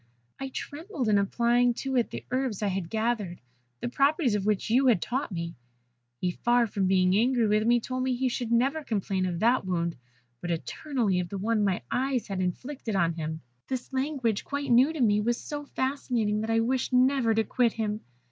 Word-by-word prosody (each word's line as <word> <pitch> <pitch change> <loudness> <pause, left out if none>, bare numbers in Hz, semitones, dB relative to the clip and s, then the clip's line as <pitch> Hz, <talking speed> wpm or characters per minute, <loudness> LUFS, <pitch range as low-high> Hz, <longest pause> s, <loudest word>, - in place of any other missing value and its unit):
I 270 - -4
trembled 290 - -5
in 205 -1 +4
applying 240 +4 +2
to 270 +1 -3
it 240 -2 +2
the - - -7
herbs 255 -5 -1
I 205 - +2
had 185 -3 -3
gathered, 220 -5 -1 0.4
the - - -2
properties 275 - +2
of 205 -1 -1
which 215 +1 0
you 260 +3 +4
had 235 -7 +5
taught 250 - -2
me. 170 -2 -4 0.7
He, 180 - 0
far 240 +5 +2
from 200 -3 -1
being 185 0 +3
angry 240 +2 +3
with 215 +1 +2
me, 240 0 +5
told 255 +2 -4
me 255 0 0
he 260 +1 0
should 240 -1 -3
never 270 +7 +2
complain 195 -5 -1
of 175 -2 -2
that 240 +3 +3
wound, 170 -3 -1 0.5
but 175 - -4
eternally 205 - -1
of 175 -1 -3
the 200 - -4
one 215 +2 +1
my 190 -9 0
eyes 260 -1 0
had 190 -1 -2
inflicted 225 +5 -3
on 170 -3 +2
him. 160 -1 -4 0.3
"This 260 0 -4
language, 260 -6 0
quite 285 -2 -3
new 255 +6 +6
to 320 - -6
me, 210 -3 +4
was 235 +2 +1
so 290 -1 -6
fascinating 245 -7 -1
that 220 - -3
I 225 0 +3
wished 255 +3 0
never 255 -2 +3
to 225 - +3
quit 240 0 +1
him. 215 -1 -2
230 Hz, 205 wpm, -28 LUFS, 200-260 Hz, 0.7 s, new